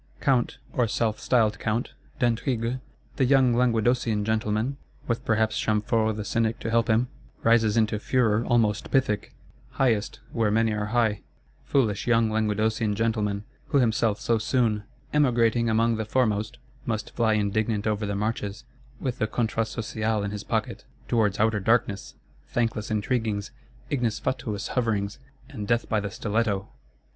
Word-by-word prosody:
Count, 130 -2 +1 0.2
or 120 -2 +2
self 110 -2 0
styled 110 -3 +2
Count, 115 +2 -2 0.2
d'Aintrigues, 120 +1 0 0.4
"the 130 - +3
young 130 -2 +4
Languedocian 120 -2 +2
gentleman," 110 +4 0 0.3
with 115 -1 -2
perhaps 110 -1 +1
Chamfort 110 +1 +1
the 105 -1 -5
Cynic 115 -1 0
to 115 - -3
help 115 +1 +2
him, 115 +3 +3 0.4
rises 115 -1 +4
into 110 -1 +2
furor 115 -2 +2
almost 115 -3 +1
Pythic; 130 -6 0 0.4
highest, 115 -6 +1
where 115 -3 +1
many 110 +1 +2
are 105 0 -2
high. 110 -3 +1 0.4
Foolish 110 -7 +1
young 115 -2 +3
Languedocian 110 0 0
gentleman; 105 -2 0 0.2
who - - +2
himself 115 -4 +2
so 115 -1 +1
soon, 110 -3 +1 0.3
"emigrating 120 -5 +3
among 115 +1 +2
the 110 - -1
foremost," 110 -2 0 0.3
must 110 -2 -3
fly 115 -2 +2
indignant 105 0 0
over 105 -1 0
the 100 - -2
marches, 105 0 -3 0.4
with 125 -2 -3
the 110 - +1
Contrat 115 -1 -1
Social 110 -1 -2
in 100 - -2
his 105 -1 -5
pocket,—towards 110 -4 -2
outer 110 0 +2
darkness, 105 -1 0 0.3
thankless 115 -3 -1
intriguings, 110 -1 -1 0.4
ignis 120 -6 0
fatuus 115 -6 -3
hoverings, 105 -4 -1 0.3
and 110 -8 -6
death 120 0 +1
by 110 - +1
the 100 -1 -3
stiletto! 105 -1 -1
110 Hz, 145 wpm, -26 LUFS, 105-120 Hz, 0.4 s, young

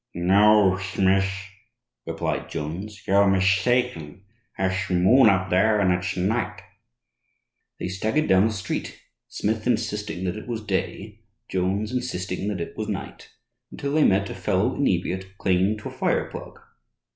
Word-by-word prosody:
"'No, 95 +2 +4
Shmith,' 95 +1 0 0.6
replied 80 0 -3
Jones, 95 +7 -6
'you're 100 +1 +4
mistaken. 95 -2 +1 0.3
Tha'sh 95 0 -1
moon 95 +7 +5
up 95 -2 +1
there, 105 +4 +3
and 95 -3 +3
it's 90 +1 -3
night.' 105 +6 -1 1.2
They - - -3
staggered 110 +11 -1
down 95 +3 +5
the - - -2
street, 95 -3 -4 0.3
Smith 110 +2 -2
insisting 105 -5 -1
that 90 +1 -2
it 110 - -9
was 115 -3 -4
day, 105 +1 -3 0.3
Jones 95 +4 -1
insisting 100 -7 -3
that 105 -3 -2
it - - -6
was - - -4
night, - - -6 0.4
until 140 0 -4
they 155 0 +4
met 100 +1 +2
a - - -4
fellow - - 0
inebriate 95 +1 -1
clinging 95 +3 +1
to 105 - -7
a - - -11
fire - - 0
plug. - - -9
95 Hz, 145 wpm, -24 LUFS, 95-110 Hz, 1.2 s, moon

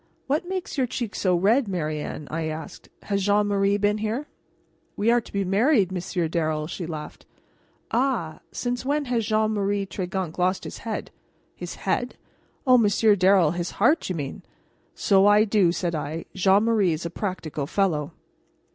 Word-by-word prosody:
"What 310 +6 -1
makes 370 -6 -3
your 255 - +2
cheeks 235 -3 -4
so 185 -2 +3
red, 220 +8 +3
Marianne?" 155 -5 -3
I 160 +1 -2
asked. 155 +1 -7
"Has 200 -1 -1
Jean 205 +1 +3
Marie 200 0 +2
been 205 +1 +1
here?" 220 +7 -2 0.7
"We 220 +3 +3
are 240 0 +3
to - - -15
be 200 0 0
married, 200 - +3
Monsieur 180 -2 -2
Darrel," 155 -2 -1
she 170 +1 -5
laughed. 155 -2 -8 0.6
"Ah! 230 -11 0
Since 245 0 -3
when 285 +2 0
has 235 -4 -1
Jean 215 0 +2
Marie 200 -1 0
Tregunc 185 -3 -4
lost 185 +1 +1
his - - -7
head?" 225 -2 -5 0.4
"His - - -7
head? - - -2 0.5
Oh, 255 -2 +6
Monsieur 210 0 +4
Darrel 185 -4 +4
his 175 0 -3
heart, 295 - +3
you 185 - -2
mean!" 145 -4 -5 0.5
"So 195 0 +4
I 205 +1 +6
do," 205 -5 +3
said 175 -1 -2
I. 155 +1 -4
"Jean 195 +2 +4
Marie 215 -6 +2
is 160 +2 -5
a 170 - -3
practical 165 -8 -4
fellow." 165 -5 0
195 Hz, 170 wpm, -25 LUFS, 170-220 Hz, 0.7 s, Oh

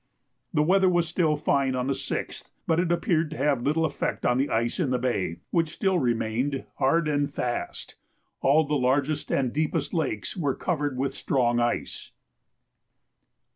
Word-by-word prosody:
The 150 - +2
weather 190 +3 +4
was 175 -2 +2
still 160 -2 +1
fine 140 -3 +1
on 125 0 -1
the 135 - +1
6th, - - -5 0.2
but 165 0 +2
it 175 -1 +1
appeared 170 -2 +1
to 155 - -7
have 140 -4 +1
little 155 +5 +1
effect 155 - -2
on 125 +1 +3
the 140 - +1
ice 115 +6 0
in 160 -7 +1
the 125 - +1
bay, 120 -9 -1
which 165 -2 +2
still 190 -3 +1
remained 125 +2 -1
hard 160 +4 +3
and 145 -1 0
fast. 120 -9 -4 0.4
All 150 +4 +4
the 150 0 -3
largest 140 +2 +1
and 130 -3 +1
deepest 155 0 -1
lakes 125 - -2
were 145 -8 -1
covered 145 -7 -2
with 135 +1 -1
strong 120 -4 +1
ice. 120 0 -2
145 Hz, 170 wpm, -26 LUFS, 125-160 Hz, 0.4 s, weather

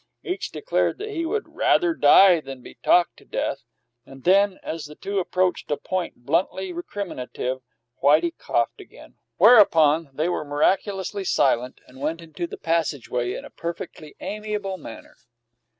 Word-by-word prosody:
Each 365 +2 -3
declared 470 - -1
that 425 +2 -6
he 335 -4 -2
would 435 +4 -1
"rather 350 -2 +2
die 190 - +6
than 135 -3 -9
be - - -11
talked 175 -2 +2
to - - -17
death"; 140 - -3 0.4
and 135 +1 -14
then, 195 +1 +4
as 160 -2 -5
the 150 - -12
two 200 +4 -3
approached 185 0 0
a 145 - 0
point 170 -5 -4
bluntly 180 +4 0
recriminative, 130 -8 -5 0.4
Whitey 160 +4 +4
coughed 120 -1 -1
again, - - -16 0.2
whereupon 165 - +6
they 155 +5 -1
were 175 -3 -1
miraculously 190 +6 0
silent, 125 -8 +1
and 130 +1 -15
went 160 +3 -2
into 165 +1 -6
the - - -8
passageway 140 -7 -1
in - - -7
a - - -12
perfectly 170 -2 -7
amiable 210 -2 -4
manner. 115 - -11
170 Hz, 150 wpm, -24 LUFS, 145-195 Hz, 0.4 s, die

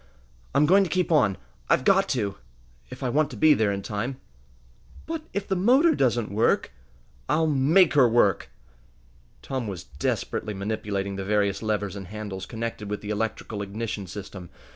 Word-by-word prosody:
I'm 150 - +5
going 195 +5 +5
to 185 - -3
keep 180 +1 0
on. 110 - +3 0.3
I've - - +3
got 195 +5 +3
to 105 -7 -1 0.5
if - - -9
I 130 - 0
want 150 +4 +2
to - - -9
be 155 -1 +6
there 110 -6 +1
in 100 0 -3
time!" 115 +7 -4 0.9
"But 325 -1 -4
if 200 0 -3
the 190 - 0
motor 260 - +4
doesn't 120 - +1
work?" 110 +3 +1 0.6
"I'll 160 +1 +2
make 155 +5 +4
her 135 -5 +5
work!" 110 -5 +2 0.9
Tom 130 -4 -3
was 95 -4 -6
desperately 80 +7 -3
manipulating 100 -1 -3
the 95 - -3
various 100 -1 0
levers 105 -3 -2
and 95 -2 -7
handles 100 -2 -6
connected 115 -2 -5
with 105 - -3
the 105 - -5
electrical 110 -1 -3
ignition 100 0 -4
system. 95 -1 -8
110 Hz, 165 wpm, -25 LUFS, 100-145 Hz, 0.9 s, be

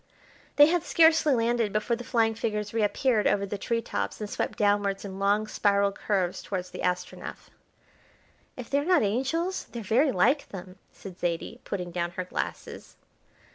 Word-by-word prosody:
They 290 - +9
had 345 +2 +2
scarcely 320 -4 +4
landed 230 -2 +1
before 215 +3 0
the 245 - -8
flying 230 -3 +1
figures 210 -2 -3
reappeared 225 +1 +2
over 200 0 +1
the 200 0 -5
tree 230 -1 -1
tops - - -3
and 210 - -4
swept - - -3
downwards 205 -1 +1
in 195 -1 -7
long 205 +2 +2
spiral 200 -2 +2
curves 190 -3 -1
towards 185 -2 -5
the - - -8
Astronef. 180 0 -4 1.1
"If 250 -2 -7
they're 280 +1 +1
not 360 -4 +3
angels, 270 - -1
they're 235 -2 -8
very 255 +8 +3
like 260 +10 +2
them," 185 -1 -9
said 185 -2 -11
Zaidie, 175 +7 -3
putting 180 -3 -4
down 170 0 -2
her 185 - -2
glasses. - - -6
210 Hz, 165 wpm, -27 LUFS, 195-245 Hz, 1.1 s, They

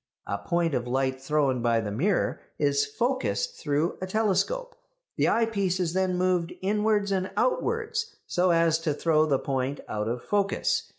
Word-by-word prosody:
A 100 - -3
point 170 -2 0
of 125 -2 -1
light 130 +1 0
thrown 135 -3 +1
by 115 -1 +2
the 105 -2 -3
mirror 175 - 0 0.2
is 145 -1 +2
focused 260 - -1
through 150 +3 0
a 185 - -3
telescope. 225 - 0 0.4
The - - +2
eyepiece 200 -5 +1
is 175 -2 0
then 185 -1 +1
moved 180 -2 +1
inwards 210 0 +1
and 190 0 0
outwards 455 -2 0
so 180 +1 +1
as 165 -1 +3
to 155 -3 -1
throw 155 0 +2
the 140 -3 +3
point 135 +1 -2
out 105 0 -2
of 120 +1 -3
focus. 200 -1 0
175 Hz, 165 wpm, -27 LUFS, 140-205 Hz, 0.4 s, as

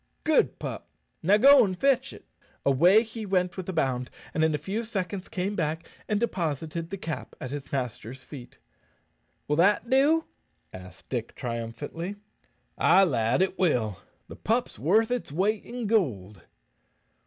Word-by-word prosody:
"Good 315 -1 +2
pup! - - -6 0.3
go 195 +5 +5
now 280 -3 +9
an' 190 -3 -1
fetch 270 +5 +2
it." - - -13 0.4
Away 175 - +5
he 225 -1 -8
went 180 -3 0
with 185 -1 -6
a - - -2
bound, 130 -5 -1 0.2
and 160 - +1
in 160 -1 +2
a - - 0
few 195 +10 -3
seconds 195 -3 -4
came 195 +2 -2
back 160 -1 -2 0.2
and 210 -1 0
deposited 165 - -2
the 195 - -5
cap 165 -4 -6
at 130 - -6
his 145 -1 -6
master's 130 -1 -4
feet. 130 -5 -11 0.9
"Will 150 - 0
that 205 +7 +3
do?" 295 +5 +4 0.5
asked 90 0 -12
Dick, 120 -3 -4
triumphantly. 125 - -5 0.6
"Ay, 195 - +6
lad, 125 -2 +2
it 190 0 -3
will. 120 - +1 0.3
The - - -11
pup's - - -1
worth 215 - +3
its 245 -11 -2
weight 200 +7 0
in 245 -1 -5
goold." 105 - 0
175 Hz, 155 wpm, -27 LUFS, 135-210 Hz, 0.9 s, now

